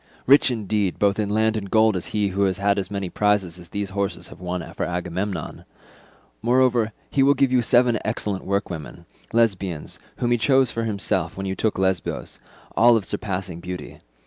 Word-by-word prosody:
Rich 140 +1 +6
indeed 105 -5 -1
both 100 0 +2
in 105 -1 0
land 110 +1 +2
and 100 -3 -4
gold 110 0 +4
is 90 - -3
he 105 -2 0
who 100 +1 +1
has 95 -2 0
as 100 -1 +1
many 100 -2 -3
prizes 95 -2 0
as 85 -1 -13
these 100 0 -4
horses 100 0 -3
have - - -13
won 90 -1 -4
for - - -3
Agamemnon. 90 0 -3 0.8
Moreover 120 -1 +3 0.2
he 140 - +2
will 140 +1 +5
give 135 -1 +2
you 125 -1 +4
seven 120 -1 +3
excellent 105 -3 -2
workwomen, 95 -6 -4 0.3
Lesbians, 100 -8 0 0.2
whom 120 - 0
he 120 - +3
chose 130 +3 +3
for 115 0 -2
himself, 100 -3 -1
when 95 - -4
you 95 - -1
took 110 +2 -1
Lesbos—all 95 +5 0
of 105 - -3
surpassing 95 -4 -4
beauty. 90 +1 -7
100 Hz, 175 wpm, -23 LUFS, 95-115 Hz, 0.8 s, Rich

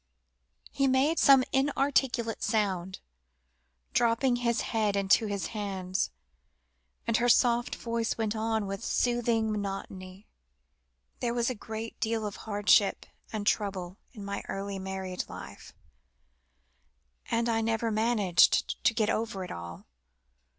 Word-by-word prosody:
He 275 -1 +1
made 270 +5 +2
some 270 -2 +7
inarticulate 270 -4 +1
sound, 190 -4 -1 0.9
dropping 240 +2 +2
his 235 -1 0
head 215 -3 0
into 200 +2 +3
his 200 -2 -3
hands, 190 -3 -2 1.0
and 230 -1 +2
her 245 +1 +2
soft 240 0 +3
voice 230 -1 -2
went 220 -1 -1
on, 220 -1 -1
with 195 0 -5
soothing 235 -2 +1
monotony 195 -1 -5 0.9
"There 240 -1 -1
was 240 +1 +1
a - - -2
great 225 0 -7
deal 225 -1 -1
of 205 - -4
hardship 205 -1 +3 0.3
and 215 -2 -4
trouble 195 -4 -1
in 210 -5 -9
my 200 0 -3
early 195 0 -4
married 190 -1 -4
life, - - -10 1.6
and 230 +1 +1
I 225 -1 +1
never 225 0 0
managed 215 -5 +3
to 225 - +3
get 220 -2 +2
over 220 -4 -2
it 180 - -7
all. 85 0 -8
220 Hz, 125 wpm, -29 LUFS, 195-235 Hz, 1.6 s, some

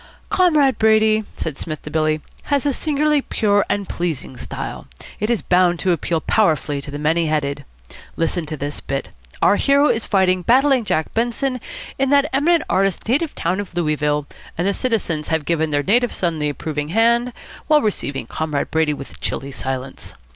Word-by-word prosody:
"Comrade 305 -8 +3
Brady," 220 0 +4
said 150 -3 -4
Psmith 155 -2 -5
to 150 - -8
Billy, 155 -1 +1 0.2
"has 285 -1 0
a 285 - +2
singularly 300 +1 +1
pure 205 -5 +1
and 200 -2 -1
pleasing 165 -6 -3
style. - - -6 0.3
It 210 - -1
is 235 -3 0
bound 180 -1 +3
to 185 +2 0
appeal 170 0 0
powerfully 155 -9 +1
to 140 - -8
the 145 - -5
many 160 +3 +1
headed. 145 -2 -1 0.5
Listen 165 0 -1
to 155 0 -5
this 145 +1 -4
bit. 135 0 -4 0.3
Our 205 - +5
hero 280 +1 +4
is 225 -2 0
fighting 185 -2 +2
Battling 260 - +3
Jack 160 -5 -1
Benson 240 +2 -1 0.4
in 270 0 +2
that 285 +1 +4
eminent 325 +5 +3
artist's 195 +1 0
native 290 +6 0
town 180 +4 -1
of 200 -4 -6
Louisville, 150 -3 0 0.3
and 175 - 0
the 200 - +2
citizens 195 - -1
have 160 -2 -1
given 160 -2 0
their 145 -1 0
native 240 +7 +2
son 170 -3 -1
the 150 0 0
Approving 150 +1 -4
Hand, 235 +6 +2 0.4
while 305 -1 +4
receiving 140 - -2
Comrade 150 +3 -3
Brady 160 -2 +1
with 140 -1 -10
chilly 140 +1 -3
silence. 130 0 -5
180 Hz, 175 wpm, -20 LUFS, 150-240 Hz, 0.5 s, Our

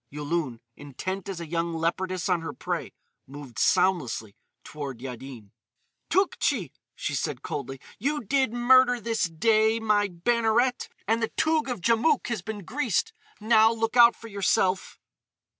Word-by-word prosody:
Yulun, 145 -4 -3 0.2
intent 185 +8 -6
as 190 -3 -5
a 170 - -5
young 165 +1 -2
leopardess 180 +3 -1
on 180 -3 +1
her 160 -3 -5
prey, - - -4 0.4
moved 135 -3 -9
soundlessly 125 - +1 0.3
toward 140 -5 -7
Yaddin. 125 -4 -9 0.6
"Tougtchi!" 280 - +1 0.2
she - - -3
said - - -3
coldly, 135 -2 -5 0.2
"you 290 +4 -1
did 265 +1 +1
murder 245 +1 +4
this 225 -2 0
day, 220 +6 +2
my 210 -2 +2
Banneret, 235 +6 +1 0.2
and 225 +2 +1
the 225 - 0
Toug 315 -3 +1
of 240 -7 -4
Djamouk 235 - +2
has 230 -5 -2
been 205 -1 -7
greased. 245 - -1 0.3
Now 220 0 +5
look 225 +1 -2
out 235 -1 +7
for 230 - -11
yourself!" 190 -2 0
200 Hz, 140 wpm, -26 LUFS, 160-235 Hz, 0.6 s, out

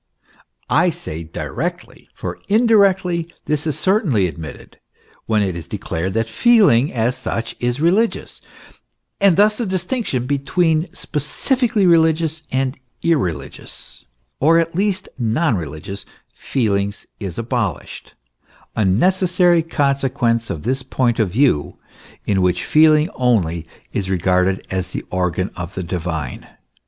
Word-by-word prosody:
I - - +3
say 80 +2 -4
directly; 80 - -5
for - - -6
indirectly 195 -6 +3
this 150 +1 -1
is 155 - 0
certainly 185 - +2
admitted, 80 -2 -9 0.5
when 110 -2 +2
it 95 -3 -2
is 85 -2 -7
declared 95 +4 -3
that 115 0 +1
feeling, 170 - +4
as 120 +1 0
such, 115 0 -4
is 120 +2 -1
religious, 190 +9 +1 0.8
and 195 -4 +4
thus 210 +2 +4
the 235 - 0
distinction 185 - -2
between 160 +4 +1
specifically 210 - 0
religious 160 -2 +2
and 130 0 -1 0.2
irreligious, 135 - -2 0.3
or 160 +4 +5
at 165 0 +1
least 190 +1 0
non 120 +4 +1
reli 80 -4 -5
gious, 100 +1 -6 0.3
feelings, 100 -5 -1
is 95 -5 -6
abolished, 115 - -3 0.6
a 110 - +1
necessary 180 - +3
consequence 135 -6 0
of 75 - -4
the 130 +1 -1
point 120 -3 +1
of 110 -4 +2
view 110 - +1 0.5
in 95 -2 +1
which 90 -1 +1
feeling 155 0 +5
only 85 -10 +1 0.3
is 95 -1 -2
regarded 95 +1 +1
as 95 -1 -2
the - - -5
organ 90 0 -1
of 85 +1 -6
the 95 - -3
divine. 80 -6 -4
130 Hz, 125 wpm, -19 LUFS, -, 0.8 s, or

